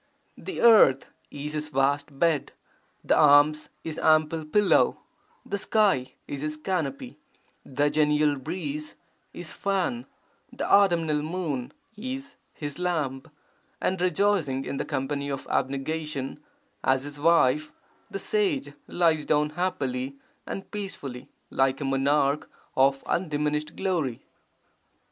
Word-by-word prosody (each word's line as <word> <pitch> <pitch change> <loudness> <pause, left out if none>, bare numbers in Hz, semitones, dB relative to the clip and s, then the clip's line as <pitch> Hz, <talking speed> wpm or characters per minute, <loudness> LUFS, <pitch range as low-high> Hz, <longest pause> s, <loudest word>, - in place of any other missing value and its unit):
The 385 - -5
earth 215 - +6 0.2
is 145 +1 -6
his 150 0 -3
vast 140 +1 0
bed, 165 -2 +1 0.5
the - - +3
arms 150 +1 +5
his 160 -1 -5
ample 155 0 +3
pillow, 205 +6 +3 0.5
the 200 - -3
sky 195 - +1
is 140 - -5
his 155 0 -3
canopy, 155 -4 -3 0.4
the 145 +2 0
genial 150 -1 +3
breeze 150 +1 -5 0.4
his 175 -2 -6
fan, 200 +5 -1 0.4
the - - -4
autumnal 170 -7 +4
moon 150 -6 -3 0.2
is 265 +5 -6 0.2
his 145 +1 -6
lamp, 150 -7 -2 0.5
and 185 -1 -1
rejoicing 180 -7 +1
in 140 - -4
the - - -2
company 140 0 -2
of 135 -1 -4
abnegation 140 +1 -2 0.4
as 130 0 +2
his 145 0 -8
wife, 155 -2 +3 0.4
the - - -4
sage 370 - 0
lies 165 -3 +2
down 150 0 +2
happily 135 -6 -2 0.3
and 195 - -6
peacefully, 145 - -6 0.2
like 135 0 +2
a 145 - -3
monarch 140 +2 +1 0.3
of 135 +1 +3
undiminished 150 -2 -1
glory. 165 - -1
150 Hz, 120 wpm, -26 LUFS, 140-175 Hz, 0.5 s, earth